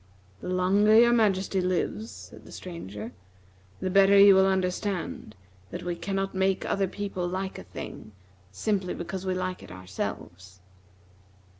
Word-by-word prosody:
"The 180 - -6
longer 195 +4 +3
your 235 0 +6
Majesty 195 -4 +2
lives," 185 +4 -1
said - - -12
the - - -12
Stranger, 110 - -7 0.7
"the 185 0 -2
better 195 +1 +6
you 200 0 +9
will 190 0 +5
understand 185 - -2 0.3
that - - -6
we 175 0 -2
cannot 195 +2 -3
make 190 0 +1
other 195 -1 0
people 190 -2 -4
like 190 +2 -4
a - - -9
thing 100 +4 -9 0.4
simply 190 - -1
because 190 +2 -5
we 185 - 0
like 185 0 -3
it - - -12
ourselves." 90 0 -7
185 Hz, 145 wpm, -27 LUFS, 175-195 Hz, 0.7 s, you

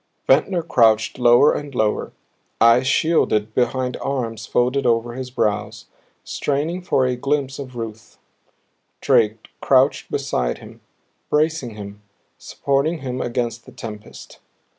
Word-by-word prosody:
Ventnor 165 +6 +2
crouched 115 -7 +2
lower 120 +4 +6
and 145 -2 -6
lower, 110 -3 0 0.5
eyes 115 +3 +5
shielded 115 -8 +1
behind 125 +1 0
arms 120 -5 -3
folded 125 +3 +1
over 120 0 +1
his 130 0 -6
brows, 105 -4 -2 0.4
straining 150 +6 -2
for 135 -7 +1
a 125 0 0
glimpse 135 +1 -2
of 130 -3 -8
Ruth; 115 -1 -8 0.8
Drake 110 0 +1
crouched - - +2
beside - - -1
him, - - -14 0.5
bracing 150 -6 0
him, 100 0 -9 0.4
supporting 140 +4 -1
him 130 -1 -4
against 120 -1 -3
the - - -11
tempest. 105 -2 -10
125 Hz, 120 wpm, -21 LUFS, 115-140 Hz, 0.8 s, lower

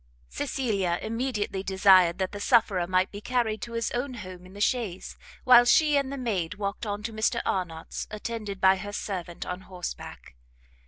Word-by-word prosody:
Cecilia 195 - -1
immediately 220 -4 -2
desired 190 -3 +5
that 190 -1 -2
the 205 - -7
sufferer 205 -6 +3
might 185 +1 +1
be 205 - -8
carried 225 -3 -1
to 235 - -6
his 230 0 -1
own 250 +1 -3
home 185 -4 -9
in 185 - -15
the 200 - -10
chaise, 210 -4 -1 0.3
while 245 -2 +8
she 300 +4 +4
and 275 -1 +1
the 280 - -4
maid 205 -8 -2
walked 200 +2 -4
on 205 0 -3
to 225 +1 -4
Mr 220 +2 +1
Arnott's, 170 -4 -3
attended 210 -2 -5
by 190 0 +5
her 205 +1 -7
servant 180 -5 -5
on 180 +1 -5
horseback. 180 - -8
205 Hz, 175 wpm, -27 LUFS, 185-235 Hz, 0.3 s, while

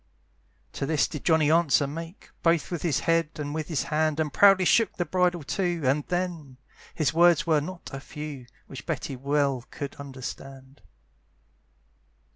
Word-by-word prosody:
To 135 - -3
this 155 -2 +2
did 150 - -7
Johnny 160 -3 +4
answer 160 -4 +3
make, 165 +6 -8
Both 165 0 +2
with 175 - -3
his 160 -6 0
head, 165 -1 +2
and 145 -1 -5
with 155 -1 -3
his 150 -7 -1
hand, 155 0 0
And 155 -3 -1
proudly 195 -2 +6
shook 225 +2 +3
the 175 - 0
bridle 180 0 +1
too, 175 +2 -1
And 140 +3 +2
then! 175 -7 -3 0.4
his 155 -1 0
words 175 +2 +5
were 155 -3 +3
not 175 +3 -8
a 135 - -4
few, 150 -3 -8 0.2
Which 135 - -10
Betty 135 - -3
well 140 -1 0
could 140 -3 -6
understand. 135 -1 -9
155 Hz, 160 wpm, -26 LUFS, 140-170 Hz, 0.4 s, proudly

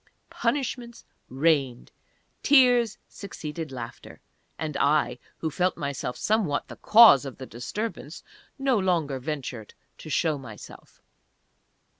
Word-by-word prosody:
Punishments 240 -1 -3 0.2
rained! 135 -3 0 0.5
Tears 245 -5 +4
succeeded 160 -5 -7
laughter! 120 -3 -9 0.4
And 155 -2 -4
I, 140 -4 +1 0.2
who 160 - -3
felt 180 +4 0
myself 140 -5 -4
somewhat 210 -10 0
the - - -10
cause 215 - +7
of 135 -3 -8
the 130 - -8
disturbance, 130 - -6 0.3
no 270 -5 +1
longer 165 -8 0
ventured 130 -6 -6 0.2
to 155 - -10
show 155 -1 0
myself. 115 -5 -13
155 Hz, 110 wpm, -26 LUFS, 135-215 Hz, 0.5 s, cause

